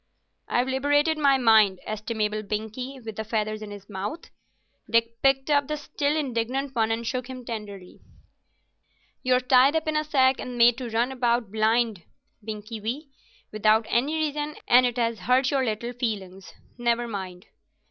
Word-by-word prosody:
"I've 245 Hz, +1 st, +1 dB
liberated 290 Hz, +4 st, +2 dB
my 280 Hz, -2 st, +4 dB
mind, 220 Hz, -6 st, +5 dB
estimable 215 Hz, 0 st, -2 dB
Binkie, 220 Hz, +6 st, -5 dB
with 220 Hz, -2 st, -7 dB
the 220 Hz, -, -2 dB
feathers 215 Hz, -1 st, -2 dB
in 215 Hz, -, -7 dB
his 205 Hz, -1 st, -10 dB
mouth." 205 Hz, -, -6 dB, 0.6 s
Dick 230 Hz, 0 st, +1 dB
picked 270 Hz, +1 st, +2 dB
up 285 Hz, -1 st, +3 dB
the 305 Hz, -, -2 dB
still 290 Hz, 0 st, -1 dB
indignant 265 Hz, 0 st, -2 dB
one 225 Hz, -3 st, +1 dB
and 225 Hz, +1 st, -2 dB
shook 250 Hz, +1 st, -3 dB
him 255 Hz, -1 st, -8 dB
tenderly. 205 Hz, -5 st, -8 dB, 1.2 s
"You're 255 Hz, 0 st, +3 dB
tied 255 Hz, +3 st, +4 dB
up 320 Hz, 0 st, 0 dB
in 310 Hz, -, 0 dB
a 305 Hz, -, +2 dB
sack 265 Hz, -3 st, +3 dB
and 250 Hz, -1 st, -6 dB
made 235 Hz, 0 st, +5 dB
to 250 Hz, -2 st, -5 dB
run 235 Hz, +3 st, 0 dB
about 240 Hz, -4 st, 0 dB
blind, 220 Hz, -2 st, +1 dB, 0.4 s
Binkie 215 Hz, +1 st, -7 dB
wee, 265 Hz, +8 st, -4 dB, 0.4 s
without 215 Hz, +1 st, +3 dB
any 275 Hz, +7 st, +1 dB
reason, 300 Hz, -1 st, -2 dB
and 250 Hz, +1 st, +6 dB
it 245 Hz, -, -4 dB
has 230 Hz, -2 st, 0 dB
hurt 255 Hz, +2 st, +2 dB
your 275 Hz, -2 st, +1 dB
little 235 Hz, +1 st, -3 dB
feelings. 195 Hz, -6 st, -4 dB, 0.3 s
Never 240 Hz, 0 st, +1 dB
mind. 190 Hz, -4 st, -6 dB
235 Hz, 165 wpm, -25 LUFS, 215-265 Hz, 1.2 s, and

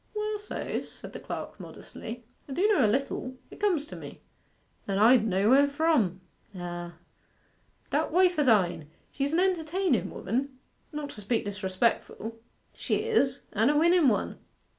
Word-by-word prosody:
'Well 425 Hz, 0 st, -2 dB
so's,' 415 Hz, -, -4 dB
said -, -, -11 dB
the -, -, -6 dB
clerk -, -, -6 dB
modestly. 235 Hz, +1 st, -9 dB, 0.2 s
'I -, -, -4 dB
do 375 Hz, +8 st, +3 dB
know 395 Hz, -11 st, +4 dB
a 215 Hz, -, +4 dB
little. 255 Hz, +1 st, -1 dB, 0.2 s
It -, -, -12 dB
comes 365 Hz, -8 st, +1 dB
to -, -, -9 dB
me.' -, -, -10 dB, 0.7 s
'And 195 Hz, -1 st, 0 dB
I 235 Hz, +5 st, +7 dB
d' 220 Hz, -, -1 dB
know 200 Hz, +3 st, +2 dB
where 280 Hz, +2 st, +6 dB
from.' 280 Hz, -, +1 dB, 0.3 s
'Ah.' 175 Hz, -1 st, -6 dB, 1.0 s
'That -, -, +1 dB
wife 360 Hz, -1 st, +4 dB
o' -, -, +5 dB
thine. 180 Hz, -, +2 dB, 0.2 s
She's 280 Hz, +2 st, -1 dB
an 335 Hz, -, +3 dB
entertainen 360 Hz, -, +1 dB
woman, 260 Hz, +7 st, -3 dB, 0.3 s
not 295 Hz, -1 st, -5 dB
to 210 Hz, -, -10 dB
speak 225 Hz, +2 st, 0 dB
disrespectful.' 205 Hz, +3 st, -1 dB, 0.3 s
'She -, -, -1 dB
is: 280 Hz, -, +1 dB
and 220 Hz, +5 st, +3 dB
a 295 Hz, -, +2 dB
winnen 335 Hz, 0 st, +5 dB
one. 215 Hz, -5 st, 0 dB
265 Hz, 160 wpm, -28 LUFS, 210-325 Hz, 1.0 s, I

